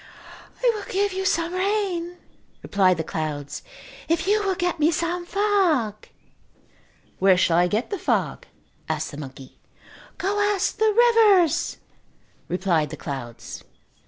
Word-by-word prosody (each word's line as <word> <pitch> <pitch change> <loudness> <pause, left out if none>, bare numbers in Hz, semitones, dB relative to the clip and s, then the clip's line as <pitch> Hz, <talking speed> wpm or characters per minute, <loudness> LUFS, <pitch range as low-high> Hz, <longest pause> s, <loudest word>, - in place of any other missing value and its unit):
"I - - +5
will 425 - -7
give 400 0 +1
you 380 +1 -3
some 335 -1 0
rain," 370 -3 -1 0.5
replied 185 -3 +3
the 160 - -2
clouds, 150 -3 -4 0.5
"if 330 0 +1
you 420 +2 +2
will 385 -2 0
get 350 -1 -1
me 305 +1 +4
some 345 +2 -2
fog." 355 - +1 1.1
"Where 190 -1 +5
shall 170 -2 +3
I 180 - +4
get 215 - -2
the 400 - -2
fog?" - - -1 0.4
asked 155 -1 -2
the 145 - -9
monkey. 135 -2 -10 0.6
"Go 400 +2 -1
ask 410 -1 +1
the 440 0 +4
rivers," 435 - +4 0.7
replied 175 -5 0
the 155 - -7
clouds. 120 -6 -7
340 Hz, 135 wpm, -24 LUFS, -, 1.1 s, I